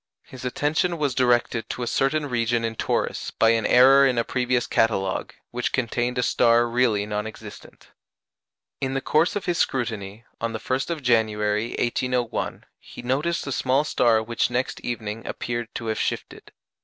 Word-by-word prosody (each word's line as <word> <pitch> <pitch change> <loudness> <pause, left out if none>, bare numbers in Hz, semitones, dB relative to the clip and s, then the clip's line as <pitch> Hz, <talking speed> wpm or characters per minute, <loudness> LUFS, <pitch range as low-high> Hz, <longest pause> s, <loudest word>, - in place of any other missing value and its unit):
His 130 -1 -12
attention 150 +7 0
was 145 -4 0
directed 120 -3 +1
to 125 - -4
a - - -1
certain 140 +5 +1
region 120 -3 0
in 115 0 -3
Taurus - - -1
by 115 - +3
an 115 -1 +1
error 135 +2 +7
in 125 -2 0
a 115 - +2
previous 125 0 0
catalogue, 95 -4 0 0.2
which 120 0 -2
contained 125 0 -1
a 125 - +1
star 120 0 +3
really 115 -4 +1
non 105 0 -3
existent. 110 - -12 0.9
In 135 0 -2
the 135 - 0
course 155 +8 +2
of 205 - -3
his 175 -1 -1
scrutiny, 110 -4 -2
on 115 0 -2
the 110 - -4
1st 130 +6 -2
of 160 -4 -3
January, 110 -2 +1
1801, 125 0 -1 0.2
he - - -12
noticed 145 +7 -1
a 140 - -4
small 130 +2 +1
star 115 -7 +2
which 115 +1 0
next 125 +1 -2
evening 115 -2 -4
appeared 120 -1 -3
to 115 - -5
have 110 -1 -2
shifted. - - -4
120 Hz, 170 wpm, -24 LUFS, 115-130 Hz, 0.9 s, error